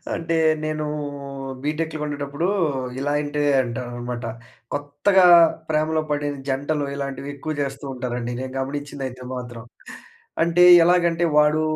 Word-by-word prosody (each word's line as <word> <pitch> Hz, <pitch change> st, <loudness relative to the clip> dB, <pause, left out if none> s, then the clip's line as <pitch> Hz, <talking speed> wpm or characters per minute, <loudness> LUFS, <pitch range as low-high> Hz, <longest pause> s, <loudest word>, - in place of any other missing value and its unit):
అంటే 165 Hz, 0 st, -2 dB, 0.3 s
నేను 155 Hz, 0 st, -2 dB, 0.8 s
బీటెక్‌లో 155 Hz, +1 st, -2 dB
ఉన్నప్పుడు, 145 Hz, +2 st, -3 dB, 0.5 s
ఇలాంటివి 145 Hz, +1 st, 0 dB
అంటానమాట. 120 Hz, 0 st, -5 dB, 0.5 s
కొత్తగా 145 Hz, +7 st, +2 dB, 0.4 s
ప్రేమలో 155 Hz, +1 st, +1 dB
పడిన 145 Hz, -1 st, -1 dB
జంటలు 145 Hz, +2 st, -1 dB
ఇలాంటివి 140 Hz, 0 st, -5 dB
ఎక్కువ 155 Hz, +3 st, -4 dB
చేస్తూ 140 Hz, 0 st, -4 dB
ఉంటారండి. 125 Hz, -1 st, -4 dB
నేను 130 Hz, 0 st, -6 dB
గమనించింది 140 Hz, 0 st, -4 dB
అయితే 125 Hz, 0 st, -10 dB
మాత్రం. 120 Hz, -2 st, -7 dB, 0.8 s
అంటే 170 Hz, +1 st, +4 dB, 0.2 s
ఎలాగంటే 175 Hz, -1 st, +3 dB
వాడు 150 Hz, +1 st, +4 dB
145 Hz, 105 wpm, -22 LUFS, 130-155 Hz, 0.8 s, అంటే